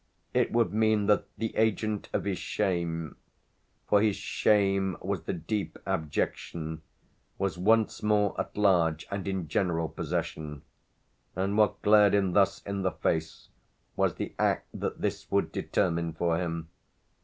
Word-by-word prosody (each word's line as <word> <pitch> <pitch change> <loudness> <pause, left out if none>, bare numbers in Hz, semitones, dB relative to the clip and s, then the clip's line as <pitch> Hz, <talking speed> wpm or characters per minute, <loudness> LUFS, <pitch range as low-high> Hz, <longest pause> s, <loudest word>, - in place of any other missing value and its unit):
It - - +2
would 115 -3 +2
mean 110 -1 +3
that 105 0 +3
the 115 +1 -3
agent 110 -1 0
of - - -1
his 100 -3 -1
shame 85 -6 -2 0.7
for 105 - +4
his 105 -2 +2
shame 95 -3 +1
was 95 -2 -2
the 80 - -3
deep 95 +4 -3
abjection 80 +1 -2 0.6
was 95 -2 -2
once 110 +3 +3
more 105 -1 +2
at - - -8
large 85 -6 +3
and 100 -1 -3
in 95 -4 -2
general 85 -2 0
possession; 75 -2 -4 0.7
and 95 +3 0
what 105 -1 +2
glared 105 -1 +6
him 95 -2 +2
thus 95 0 +3
in 100 0 -3
the 95 - +2
face 80 0 -2 0.5
was - - +1
the - - -5
act - - +1
that - - -4
this - - -2
would - - +1
determine 85 -3 0
for 85 0 0
him. 85 -2 -3
95 Hz, 145 wpm, -29 LUFS, 85-105 Hz, 0.7 s, glared